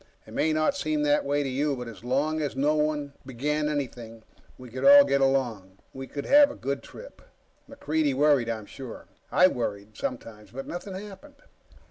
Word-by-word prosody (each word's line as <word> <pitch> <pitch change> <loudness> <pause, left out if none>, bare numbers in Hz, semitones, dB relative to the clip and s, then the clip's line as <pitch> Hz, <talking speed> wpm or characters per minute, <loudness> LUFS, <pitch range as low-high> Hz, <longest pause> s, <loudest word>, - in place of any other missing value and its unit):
It - - -13
may 160 - +1
not 155 - +1
seem 300 +1 -1
that 295 0 +2
way 145 +1 0
to - - -3
you. 140 +2 0
But 125 -1 -7
as 115 -1 -11
long 145 +5 0
as 145 -3 -3
no 145 +3 +2
one 150 -2 -1
began 150 +4 -2
anything, 120 -6 -5 0.3
we 125 -2 -12
could 130 - -5
all 285 0 +9
get 140 0 +1
along. 120 -9 0 0.2
We 135 0 -7
could 140 +1 -6
have 290 0 +6
a 285 - -8
good 140 0 -3
trip. - - -13 0.5
MacReidie 155 - -1
worried, 140 -4 +3
I'm 110 -2 -4
sure. 130 +2 -10 0.3
I 180 - +5
worried, 105 - -4
sometimes. 110 -4 -6
But 135 +3 -7
nothing 185 +2 -6
happened. 210 +9 -10
140 Hz, 185 wpm, -26 LUFS, 125-155 Hz, 0.5 s, all